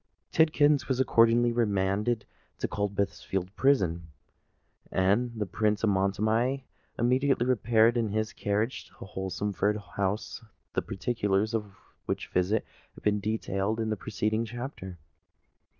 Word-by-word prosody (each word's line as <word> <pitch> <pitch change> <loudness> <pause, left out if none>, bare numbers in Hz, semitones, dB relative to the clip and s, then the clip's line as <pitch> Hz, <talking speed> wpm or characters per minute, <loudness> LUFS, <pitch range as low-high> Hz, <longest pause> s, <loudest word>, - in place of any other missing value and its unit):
Tidkins 150 -4 +4
was 130 -2 0
accordingly 120 -1 +4
remanded 105 0 0 0.3
to - - -2
Coldbath 100 -1 -2
Fields' 95 -1 -2
Prison; 95 -10 +1 0.8
and 100 +6 +2
the 105 - 0
Prince 105 +3 0
of 110 - +4
Montoni 110 +7 +1 0.3
immediately 125 +1 +2
repaired 115 -2 +3
in 115 -2 +1
his 110 +1 -1
carriage 105 +5 -1
to - - -22
Holmesford 95 +2 -2
House—the 100 +2 -4
particulars 105 0 -1
of 105 -3 -3 0.3
which - - -3
visit 95 +5 +1 0.3
have - - -14
been 105 0 +2
detailed 105 0 -1
in 110 -1 -1
the - - +1
preceding 110 +2 -1
chapter. 120 -6 -7
110 Hz, 120 wpm, -28 LUFS, 100-120 Hz, 0.8 s, Tidkins